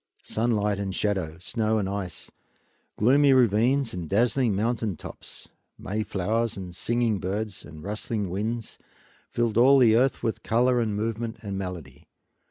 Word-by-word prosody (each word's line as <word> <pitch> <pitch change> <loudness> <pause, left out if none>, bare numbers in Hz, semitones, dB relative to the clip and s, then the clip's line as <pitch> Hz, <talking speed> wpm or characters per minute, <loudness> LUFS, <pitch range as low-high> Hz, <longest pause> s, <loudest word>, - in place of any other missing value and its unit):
Sunlight 105 -3 0
and 95 -1 -3
shadow, 95 -7 -1
snow 110 +5 -1
and 100 -3 0
ice, 95 -3 -5 0.7
gloomy 135 +5 +5
ravines 125 +2 +3
and 85 -4 -5
dazzling 120 +1 +2
mountain 110 -3 -1
tops, - - -10 0.3
mayflowers 110 +2 -2
and 90 -2 -7
singing 115 -1 0
birds 100 +2 -3
and 75 0 -11
rustling 105 -1 -3
winds 110 +4 -3 0.5
filled 115 -2 0
all 135 +3 +7
the 115 -4 +6
earth 130 +2 +2
with 110 - -1
color 125 +2 +2
and 110 -3 -1
movement 110 +2 -3
and 100 -2 -4
melody. 90 -9 -7
110 Hz, 140 wpm, -26 LUFS, 95-120 Hz, 0.7 s, all